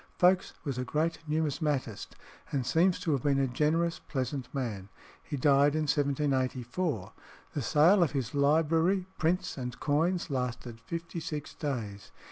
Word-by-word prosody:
Folkes 180 +1 +3
was 135 -5 -3
a - - 0
great 160 +5 -1
numismatist, 150 - -1 0.4
and 135 -3 -1
seems 175 +8 +3
to 165 - 0
have 140 -4 +1
been 140 0 +2
a 135 - +3
generous, 160 +6 +1
pleasant 130 -2 -4
man. 110 -8 -4 0.3
He 145 - -5
died 140 +2 +4
in 155 - +1
1784. 135 - 0 0.4
The 145 - -2
sale 160 - +5
of 170 - +2
his 130 -3 -2
library, 160 +6 +3
prints, 170 +1 0
and 125 -1 -5
coins 165 +3 +1
lasted 125 -3 -3
fifty 170 +5 -5
six 150 -2 -5
days. 105 -9 -4
145 Hz, 145 wpm, -30 LUFS, 130-160 Hz, 0.4 s, sale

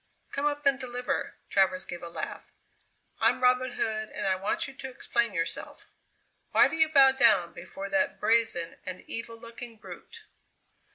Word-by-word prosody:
"Come 280 +1 0
up 290 0 -3
and 275 -1 +3
deliver!" 250 -1 -3 0.2
Travers 190 -1 +2
gave 175 -1 -7
a 170 - -7
laugh. - - -7 0.7
"I'm - - +3
Robin 250 0 +3
Hood 215 -2 -2
and - - -5
I 190 -1 +2
want 210 - -1
you 270 - -10
to 265 0 -8
explain 235 -3 -1
yourself. 165 -2 -4 0.7
Why - - +7
do - - -4
you 315 -1 +4
bow 275 -3 +7
down 225 -10 +4
before 190 +3 -8
that 280 -1 0
brazen 215 -6 +1
and 185 -1 -6
evil 230 0 -6
looking 230 0 -10
brute?" - - -12
235 Hz, 165 wpm, -28 LUFS, 195-270 Hz, 0.7 s, Why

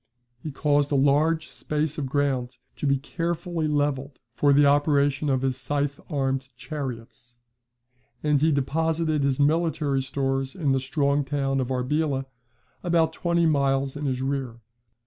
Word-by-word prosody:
He 155 - -5
caused 145 +1 +1
a - - +2
large 150 +4 +2
space 150 0 -2
of 140 - -2
ground 130 -3 -1 0.2
to 145 - -2
be 140 0 +3
carefully 170 +2 -3
levelled 145 -2 -1 0.2
for 145 +4 +3
the 145 +1 +5
operation 145 0 +2
of 130 -1 +1
his 130 -1 0
scythe 145 -1 -2
armed 135 -3 -1
chariots; 125 -3 -7 0.9
and 150 -2 +2
he 160 +1 +4
deposited 155 +2 0
his 140 0 +1
military 150 -2 +1
stores 135 0 -2
in 150 -7 0
the 135 - +2
strong 140 +2 +1
town 135 -1 -1
of 130 - -1
Arbela, 135 +2 0 0.6
about 165 -2 +2
twenty 170 0 +1
miles 140 -3 +1
in 145 0 -4
his 130 -1 -1
rear. 135 -4 -3
140 Hz, 145 wpm, -25 LUFS, 135-150 Hz, 0.9 s, the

